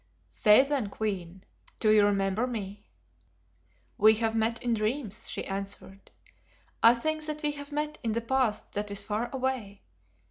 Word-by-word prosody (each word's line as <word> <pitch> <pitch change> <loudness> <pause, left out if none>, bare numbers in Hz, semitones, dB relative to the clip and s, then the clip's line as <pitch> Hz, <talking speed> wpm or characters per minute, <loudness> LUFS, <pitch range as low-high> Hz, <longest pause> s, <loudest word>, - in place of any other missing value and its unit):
"Say, 210 +4 +6
then, 275 -7 -1
Queen, 190 -4 -4 0.4
do 215 - +4
you 215 -1 +6
remember 200 +3 +1
me?" 205 -4 -6 1.1
"We 215 +1 +7
have 225 0 0
met 225 +1 +1
in 240 -1 +1
dreams," 220 0 -2
she - - -4
answered, 195 0 -6 0.7
"I 230 +1 +7
think 310 +5 -2
that 305 0 -4
we 295 - +2
have 285 0 -9
met 300 +1 -3
in 225 -2 -1
a - - 0
past 245 -2 0
that 205 0 -3
is 200 -1 -3
far 220 +3 -2
away. 255 -7 -3
220 Hz, 155 wpm, -28 LUFS, 205-260 Hz, 1.1 s, We